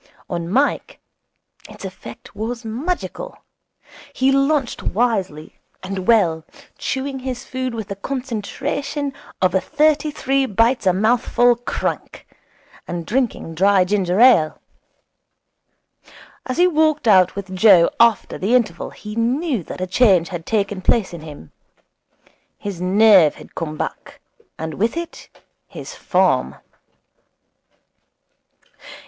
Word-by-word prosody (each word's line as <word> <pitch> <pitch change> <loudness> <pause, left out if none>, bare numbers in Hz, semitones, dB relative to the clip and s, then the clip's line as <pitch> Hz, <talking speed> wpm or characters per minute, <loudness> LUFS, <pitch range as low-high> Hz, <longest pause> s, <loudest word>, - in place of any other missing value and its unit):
On 170 -1 -3
Mike 270 +9 0 0.7
its - - -10
effect - - -11
was 230 +2 -5
magical. 350 - -4 0.8
He 265 +1 +2
lunched 275 -1 +1
wisely 195 -9 -2 0.2
and 190 0 -5
well, 175 -9 +3 0.4
chewing 270 0 -3
his 255 0 -5
food 255 -2 -4
with 220 -3 -5
the 200 - -5
concentration 270 +5 -4 0.3
of 185 - +3
a 190 - +2
thirty 305 0 +1
three 275 -2 0
bites 230 +1 +1
a - - +6
mouthful 240 +4 +2
crank, 240 +1 -4 0.6
and 175 -1 -5
drinking 235 -8 -2
dry 190 +2 +3
ginger 190 -1 0
ale. 195 -12 +5 1.9
As 255 - -3
he 355 - +5
walked 310 -5 +2
out 185 -4 +5
with 195 -1 -6
Joe 185 -4 +6
after 235 -1 +3
the 215 +6 +1
interval 215 -9 0
he 210 0 -9
knew 250 - 0
that - - -8
a - - 0
change 185 -3 +3
had 175 -3 -7
taken 205 -3 -1
place 190 -1 +1
in 170 - -8
him. 145 - -11 1.1
His 195 -4 -6
nerve 190 -3 +5
had - - -14
come 155 -2 -5
back, - - -6 0.4
and 160 0 -5
with 225 - -1
it 340 0 -7 0.4
his - - -9
form. - - +1
220 Hz, 120 wpm, -20 LUFS, 185-260 Hz, 1.9 s, a